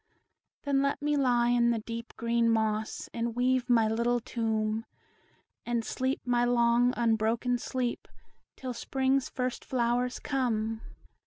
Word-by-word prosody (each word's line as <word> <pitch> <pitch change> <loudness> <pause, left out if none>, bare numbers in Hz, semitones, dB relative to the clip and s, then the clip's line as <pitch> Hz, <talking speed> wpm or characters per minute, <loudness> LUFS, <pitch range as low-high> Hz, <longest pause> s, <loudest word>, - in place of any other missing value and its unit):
Then 280 -1 +2
let 280 0 0
me 295 0 0
lie 245 -4 +3
in 240 -1 +3
the 235 - +2
deep 230 +1 -7
green 235 0 +1
moss, 220 -1 0
And 230 0 -2
weave 250 0 +1
my 230 -2 +4
little 235 +2 +1
tomb, 220 -2 -1 0.8
And 235 -1 -1
sleep 260 +1 -1
my 245 -1 +2
long, 240 0 +3
unbroken 230 +1 +1
sleep 245 -1 -3 0.5
Till 255 -1 -5
Spring's 265 +2 0
first 250 -1 -3
flowers 245 0 0
come. 225 -5 -1
240 Hz, 135 wpm, -29 LUFS, 230-250 Hz, 0.8 s, my